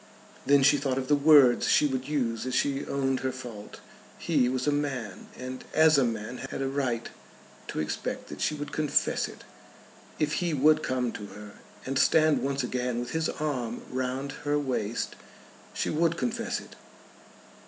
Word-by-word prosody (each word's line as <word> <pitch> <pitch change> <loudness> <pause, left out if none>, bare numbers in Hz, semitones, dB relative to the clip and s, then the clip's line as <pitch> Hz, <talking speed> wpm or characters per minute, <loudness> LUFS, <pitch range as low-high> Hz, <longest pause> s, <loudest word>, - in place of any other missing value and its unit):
Then 140 -1 +5
she 145 +2 +6
thought 135 -2 -1
of 130 -1 -3
the 145 - +6
words 145 -4 +6
she - - +4
would 130 -2 -2
use 125 -5 -1
as 130 - -2
she 140 0 0
owned 135 -1 0
her 130 - -1
fault. 120 -5 -9 0.4
He 125 - +1
was 130 0 -1
a 145 - +3
man, 135 -9 -3
and 130 0 -6
as 155 -2 +6
a - - +4
man 115 +1 -3
had - - -5
a 135 - -1
right 130 -4 -1 0.6
to - - -4
expect 75 - -3
that - - -8
she 155 - +1
would 145 0 -6
confess 150 -2 +1
it. - - -12 0.7
If 150 -1 0
he 170 -3 0
would 155 +3 +4
come 125 -4 -1
to 105 -2 -7
her, 105 0 -11 0.3
and 135 0 -1
stand 155 -1 +4
once 135 -1 -1
again 125 -1 -2
with 120 0 -5
his 160 0 0
arm 125 -7 -3
round 130 +2 -2
her 145 0 +1
waist, 125 -6 -2 0.6
she - - -2
would 165 +1 +1
confess 125 - -2
it. - - -13
135 Hz, 175 wpm, -28 LUFS, 125-145 Hz, 0.7 s, she